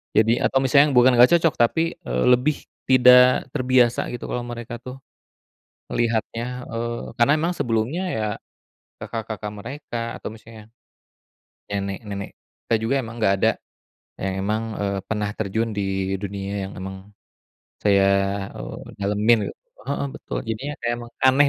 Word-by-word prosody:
Jadi 115 +2 +4
atau 135 - +2
misalnya 140 +2 +5
bukan 125 +1 +7
gak 125 +4 +8
cocok, 165 -2 +3
tapi, 120 +7 +3 0.2
eee, 65 +1 0
lebih 130 +5 +3 0.3
tidak 125 0 +6
terbiasa 125 -3 +2
gitu 120 - -6
kalau 120 - -2
mereka 120 0 -6
tuh, 130 +1 -8 0.9
melihatnya, 120 +2 -1
eee, 115 +1 -4
karena 120 +5 +5
memang 165 +3 0
sebelumnya 120 +9 0
ya, 110 -10 -1 0.8
kakak-kakak 110 -2 -5
mereka 130 +4 -7 0.2
atau - - -5
misalnya, 110 -1 -14 1.0
nenek-nenek 100 0 -4 0.3
kita 115 - +3
juga 125 +5 +1
emang 115 -2 -6
gak 95 - +4
ada, - - +4 0.7
yang 95 0 -1
emang, 110 +1 0 0.2
eee, 100 -1 -1
pernah 105 -1 -1
terjun 110 +2 -1
di 95 -1 -1
dunia 100 0 -4 0.2
yang - - -11
emang, 95 +1 -8 0.7
saya, 100 -1 +4 0.5
eee, - - -7 0.2
dalemin 105 +3 +3
gitu, - - -10 0.3
heeh, 140 - -1
betul - - -5
jadinya 120 +6 -4
kayak 120 - 0
emang 120 0 -10
aneh 135 +2 +6
115 Hz, 140 wpm, -23 LUFS, 105-125 Hz, 1.0 s, gak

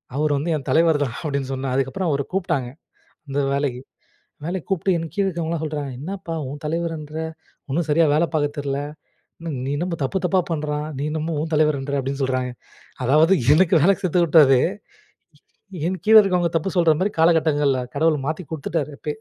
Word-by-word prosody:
அவர் 150 0 +1
வந்து 150 +5 -2
என் 135 - -10
தலைவர்தான் 150 -6 +2
அப்டின்னு 140 -3 -2
சொன்னேன். 130 -1 -3
அதுக்கப்புறம் 135 +7 -1
அவர 140 -1 0
கூப்ட்டாங்க 165 -10 -1 0.6
அந்த 140 +1 -3 0.2
வேலைக்கு. 140 -3 -1 0.7
வேலைக்கு 175 0 -4
கூப்ட்டு 190 0 +1
என் 165 -1 -5
கீழ 200 - +1
இருக்கிறவங்கலாம் 165 -3 -2
சொல்றாங்க 150 -3 -3
"என்னப்பா? 180 +2 -5
உன் 145 +2 -8
தலைவர்ன்ற 160 -1 -3 0.5
ஒண்ணும் 160 +4 -1
சரியா 165 +2 +4
வேலை 155 +3 +3
பாக்க 145 -1 +2
தெரியல. 140 -1 -2 0.9
நீ - - -2
என்னமோ 175 +2 -2
தப்பு 135 +8 -1
தப்பா 185 +1 +2
பண்றான். 150 -1 -2
நீ 140 - -3
என்னமோ 160 +1 -2
உன் 160 +1 -4
தலைவர்ன்ற" 145 -2 +1
அப்டின்னு 135 +1 -4
சொல்றாங்க. 130 -1 -1 0.5
அதாவது 155 +7 +4 0.2
எனக்கு 180 +2 +4
வேலைக்கு 195 +3 +3
கத்துகுடுத்தவரே. 155 -7 +5 1.3
என் 185 +1 -2
கீழ 220 +1 +6
இருக்குறவங்க 180 -4 +2
தப்பு 165 +4 -2
சொல்ற 170 -2 +5
மாரி 190 +3 +1
காலகட்டங்கள்ல 155 -5 +3 0.2
கடவுள் 155 +1 +2
மாத்தி 160 +4 -3
கொடுத்துட்டாரு 155 0 -3
எப்பயே. 150 -1 -5
155 Hz, 160 wpm, -22 LUFS, 140-170 Hz, 1.3 s, கீழ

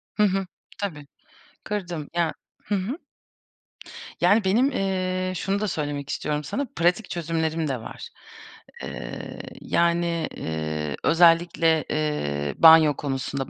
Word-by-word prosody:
Hı 210 - +3
hı. 195 -1 +1 0.3
Tabii. 150 -8 -5 0.6
Kırdım 175 -8 -4
ya 170 -2 +1 0.3
Hı 205 - 0
hı. 200 +9 -2 1.2
Yani, 215 +1 +5
benim, 235 +9 +3
eee, 185 -2 -1
şunu 195 +3 -1
da 215 - -1
söylemek 145 -5 -3
istiyorum 150 +1 -2
sana, 270 - -2
pratik 175 +5 +1
çözümlerim 160 -1 -1
de 135 -3 -1
var. - - -9 0.7
Eee, - - -7 0.2
yani, 170 -1 +1
eee, 80 -2 -3
özellikle, 165 -1 +4
eee, 75 - -1
banyo 160 -2 +8
konusunda 135 -1 -3
165 Hz, 115 wpm, -25 LUFS, 145-185 Hz, 1.2 s, banyo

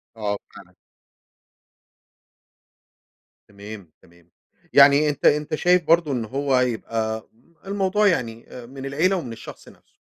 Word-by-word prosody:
آه، 105 -2 -3 0.2
فعلًا. - - -15 2.7
تمام، 100 -3 -11
تمام 85 -1 -24 0.4
يعني 140 +2 +6
أنت 145 - -4
أنت 150 +1 +2
شايف 180 +2 +3
برضو 165 -2 +3
إن 120 -4 -2
هو 135 +2 0
يبقى 110 -2 -2 0.4
الموضوع 200 +1 +1
يعني، 115 - -1
آآ، 125 - -11
من 135 +2 -9
العيلة 160 +8 +1
ومن 130 -11 -5
الشخص - - -12
نفْسه. - - -24
135 Hz, 120 wpm, -22 LUFS, 110-155 Hz, 2.7 s, يعني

